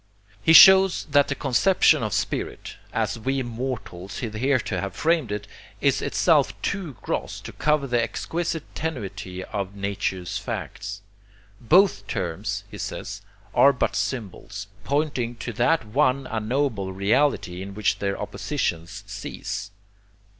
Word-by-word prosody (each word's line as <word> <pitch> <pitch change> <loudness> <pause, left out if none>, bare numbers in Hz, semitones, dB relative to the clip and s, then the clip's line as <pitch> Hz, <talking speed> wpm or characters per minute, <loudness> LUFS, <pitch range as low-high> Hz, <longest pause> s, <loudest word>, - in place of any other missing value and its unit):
He 160 - +3
shows 190 +1 +8
that 145 0 +5
the 140 - -2
conception 140 +9 +3
of - - -2
spirit, - - -3
as - - -1
we 135 +3 -1
mortals 115 -6 -5
hitherto 120 +3 0
have 95 -1 -5
framed 155 -3 +1
it, 105 0 -3 0.3
is - - +2
itself - - +2
too 190 -7 -2
gross - - -3
to - - -8
cover 150 -2 +1
the 120 -3 +1
exquisite 165 +5 -2
tenuity 100 - -5
of 100 0 -4
nature's 95 -2 -2
facts. 100 +3 -6 0.6
Both 180 - +4
terms, 90 -6 -3
he - - -8
says, 100 0 -5 0.3
are 140 - +7
but 125 - -1
symbols, 105 -4 -4 0.2
pointing 140 -5 -1
to 120 0 -6
that 125 +6 +2
one 130 +3 +1
unknowable 110 -3 -1
reality 100 -2 +1
in 100 +1 -7
which 105 +1 +1
their 100 -1 -2
oppositions 85 - -3
cease. 105 +1 -5
120 Hz, 130 wpm, -24 LUFS, 100-145 Hz, 0.6 s, shows